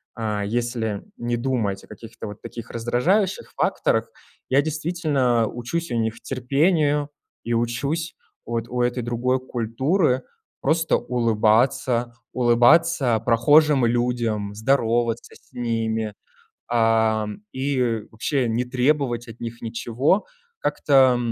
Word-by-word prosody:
а, 105 -3 -2
если 115 -1 -2
не 120 0 -2
думать 115 -6 -1
о - - -16
каких-то 115 +1 -10
вот 105 0 -9
таких 115 -1 -8
раздражающих 165 - 0
факторах, - - +1 0.4
я 135 +2 +4
действительно 150 -6 0
учусь 140 +10 -4
у - - -1
них 110 +1 -2
терпению 145 +3 +1 0.3
и 120 - -2
учусь 135 +8 -1 0.3
вот 115 0 -3
у 125 0 -1
этой 120 +1 0
другой 120 +2 0
культуры 130 - 0 0.4
просто 160 +3 +2
улыбаться, 120 +1 +1 0.2
улыбаться 120 +1 +4
прохожим 135 +4 +4
людям, 115 -4 0
здороваться 115 0 0
с - - -22
ними, 110 -2 -2 0.6
а, 110 -2 +2 0.3
и 130 -4 0
вообще 125 +3 -1
не 115 +2 0
требовать 125 -1 0
от 115 +1 -11
них 115 0 -6
ничего, 120 - 0 0.4
как-то 130 - +3
120 Hz, 115 wpm, -23 LUFS, 115-135 Hz, 0.6 s, я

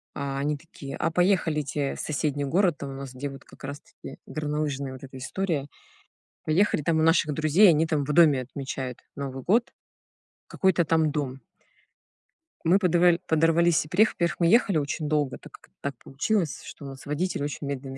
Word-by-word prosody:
А, 140 -1 -3
они 145 +1 -1
такие: 140 -3 -9
"А 165 - 0
поехали-те 155 -6 +1
в - - -10
соседний 145 -2 -1
город". 175 +2 +2
Там 140 - -5
у - - -7
нас, 135 -1 -7
где 135 +3 -4
вот 135 0 -11
как - - -17
раз-таки 145 +1 -9
горнолыжная 150 -3 -3
вот 130 - -11
эта 130 0 -10
история. 150 +1 -2 0.8
Поехали, 160 0 +2
там 160 +1 +1
у - - +3
наших 160 -2 +3
друзей, 155 +7 +5
они 160 0 +3
там 155 -3 0
в 150 - -2
доме 150 -5 +5
отмечают 130 -1 -5 0.2
Новый 135 -2 -5
год. 230 +6 +2 0.8
Какой-то 190 -3 +2
там 160 -1 +2
дом. 135 -3 -3 1.3
Мы 175 +4 +5
подова 175 -2 +4
подорвались 165 +1 +3
и - - -11
приехали. 200 +8 +3
Во-первых, 175 +1 -1
мы 170 - +3
ехали 205 -3 +4
очень 150 +1 -2
долго, 150 -3 0
так - - -15
как - - -16
так 140 -1 -3
получилось, 165 +4 -1
что 145 - -10
у - - -6
нас 135 -1 -11
водитель 150 +2 -2
очень 145 0 -4
медленно 135 -1 -5
150 Hz, 180 wpm, -26 LUFS, 140-170 Hz, 1.3 s, друзей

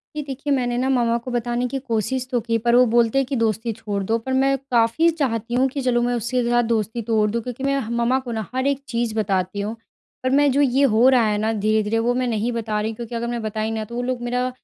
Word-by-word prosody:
जी 305 - -2
देखिए, 280 +1 -3
मैंने 245 -2 0
ना 260 +2 0
मम्मा 235 -3 +2
को 255 - -4
बताने 240 +1 -1
की 270 +2 -3
कोशिश 255 +1 -2
तो 245 - +2
की, 230 0 0
पर 235 +1 +2
वो 250 +1 +6
बोलते 235 +2 +3
हैं 270 - +3
कि 275 - -2
दोस्ती 225 0 0
छोड़ 200 -1 -4
दो। 225 +4 +1
पर 260 +3 -4
मैं 270 +1 +2
काफ़ी 235 +8 +3
चाहती 240 -8 -2
हूँ 255 +2 +3
कि 275 +1 -4
चलो 245 -2 +1
मैं 245 0 0
उसके 240 +2 -1
साथ 240 0 +3
दोस्ती 225 +1 -1
तोड़ 215 -2 +3
दूँ 235 - -1
क्योंकि 250 +3 -7
मैं 275 0 +1
ह 225 - -5
मम्मा 235 +2 +1
को 250 -2 -7
ना 220 -2 -3
हर 260 +1 +1
एक 280 -1 0
चीज 235 -3 -1
बताती 195 -2 -1
हूँ। 215 +3 -3 0.5
पर 255 - +1
मैं 285 +2 +4
जो 280 +3 +2
ये 270 0 +3
हो 235 -1 +4
रहा 250 -3 +4
है 210 -1 +1
ना 220 +1 0
धीरे-धीरे 215 +1 +1
वो 240 +2 +1
मैं 255 +1 0
नहीं 230 0 -1
बता 220 -2 -2
रही 220 +1 -2
क्योंकि 235 +1 -7
अगर 235 +1 -2
मैं 240 -1 -3
बताई 215 0 -2
ना, 220 -1 -2
तो 235 - -9
वो 245 - -1
लोग 250 0 -2
मेरा 250 +1 -1
240 Hz, 270 wpm, -22 LUFS, 225-255 Hz, 0.5 s, वो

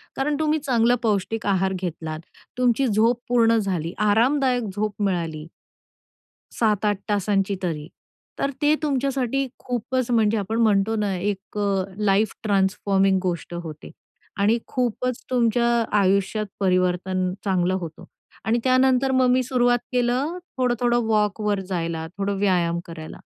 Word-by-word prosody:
कारण 285 +2 0
तुम्ही 310 0 +1
चांगला 245 -3 +2
पौष्टिक 210 0 -1
आहार 190 -1 +1
घेतलात, 165 -4 -4 0.4
तुमची 250 +1 +2
झोप 225 +3 +2
पूर्ण 230 -2 +4
झाली, 180 -6 -2
आरामदायक 245 +4 +2
झोप 210 0 -2
मिळाली 165 -5 -2 1.1
7-8 210 -2 +2
तासांची 200 -1 +1
तरी, 155 -3 -3 0.5
तर 280 - 0
ते 295 +1 +4
तुमच्यासाठी 275 -2 0
खूपच 250 0 -2
म्हणजे 225 -2 +3
आपण 210 +3 -2
म्हणतो 215 0 +3
ना 205 -2 0
एक 200 +2 -4
अ, 200 -2 +1
लाईफ 210 0 +2
ट्रान्सफॉर्मिंग 195 -1 +2
गोष्ट 175 -2 -3
होते 155 -2 -9 0.5
आणि 215 +4 +3
खूपच 250 0 -2
तुमच्या 235 -1 +2 0.3
आयुष्यात 200 +2 +1
परिवर्तन 185 0 +1
चांगलं 185 -1 +1
होतं. 160 -2 -8 0.4
आणि 230 +2 +2
त्यानंतर 260 0 +3
मग 260 -1 +3
मी 255 +1 +3
सुरुवात 245 -1 +2
केलं 255 +7 0 0.2
थोडं-थोडं 240 -1 +1
वॉकवर 210 -1 +1
जायला, 165 -3 -2
थोडं 200 0 -1
व्यायाम 175 -4 +1
करायला. 160 -2 -9
210 Hz, 125 wpm, -23 LUFS, 190-245 Hz, 1.1 s, पूर्ण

